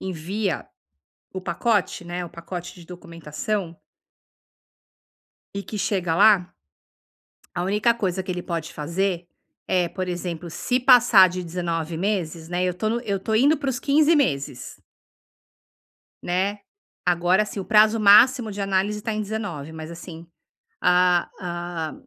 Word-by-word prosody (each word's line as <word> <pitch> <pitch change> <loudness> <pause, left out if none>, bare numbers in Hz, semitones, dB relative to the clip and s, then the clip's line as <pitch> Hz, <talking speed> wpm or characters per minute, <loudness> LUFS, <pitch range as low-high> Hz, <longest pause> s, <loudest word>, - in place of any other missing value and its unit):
envia 190 +2 -3 0.7
o 185 - -5
pacote, 185 +1 -1
né, 175 +1 -5
o 170 - -10
pacote 175 +1 -8
de 175 - -13
documentação 170 +1 -5 1.8
e 200 - -4
que 210 - -6
chega 185 -3 0
lá 200 -1 +4 1.0
a 175 - -2
única 210 +5 +2
coisa 190 -4 -2
que 185 - -6
ele 180 -1 -3
pode 165 -3 -4
fazer 175 +3 -2 0.4
é, 180 -2 +1
por 185 +1 -5
exemplo, 175 -1 -5
se 250 +9 -1
passar 245 -7 +7
de 180 0 -5
19 165 -1 -3
meses, 170 -4 -2
né, 180 +1 -1
eu 180 - 0
estou 215 +5 -2
no 235 - -1
eu 200 -4 -2
estou 220 +3 -1
indo 285 +7 +4
para 275 -1 -2
os 245 - -3
15 300 +4 +3
meses 140 - -2 1.4
né, 190 +4 -1 0.5
agora 180 +3 +3
assim, 210 -1 -5
o - - -6
prazo 215 +2 +4
máximo 215 +2 +6
de 200 - -6
análise 195 +2 0
está 220 +1 -3
em 215 0 -2
19, 195 -8 -5
mas 160 0 -8
assim, 170 -1 -10 0.6
a 180 -1 +3
a 175 -2 -5
185 Hz, 145 wpm, -23 LUFS, 170-210 Hz, 1.8 s, passar